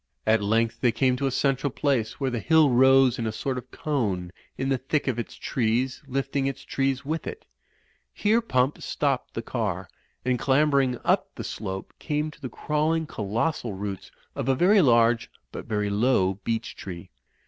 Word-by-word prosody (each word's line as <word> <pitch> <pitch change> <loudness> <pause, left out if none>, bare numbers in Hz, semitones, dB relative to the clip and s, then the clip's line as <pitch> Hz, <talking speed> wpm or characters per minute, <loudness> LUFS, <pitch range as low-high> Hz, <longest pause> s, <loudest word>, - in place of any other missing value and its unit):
At 110 -1 +3
length 115 +3 +1
they 120 - +4
came 125 +3 +2
to 135 - 0
a - - +2
central 135 +2 +1
place 130 -5 -1
where 135 -2 0
the 120 - -2
hill 160 +1 +4
rose 130 0 +5
in 115 - -1
a - - -1
sort 130 +4 -3
of - - -14
cone 100 - -2 0.3
in 135 +1 -1
the 135 -2 +1
thick 140 +3 -1
of 125 -3 0
its 120 - -5
trees, 125 +2 -1
lifting 135 +1 -1
its 135 -1 -4
trees 135 0 -1
with 160 +3 -3
it. 450 0 -7 0.7
Here 220 +3 +2
Pump 130 - 0
stopped 140 -3 -1
the 115 - -3
car, 100 -7 -2 0.4
and 125 -1 +1
clambering 135 -2 +3
up - - +2
the - - -5
slope, 95 -3 -5
came 150 0 -2
to - - -19
the 130 - -4
crawling 155 +4 0
colossal 115 +1 -2
roots 100 -1 -6 0.2
of 135 - -2
a 135 - +4
very 190 +8 +5
large 115 -4 +4 0.2
but - - -7
very 105 -1 -1
low 100 -4 +2
beech 115 -1 -2
tree. 85 -3 -8
130 Hz, 180 wpm, -26 LUFS, 115-140 Hz, 0.7 s, rose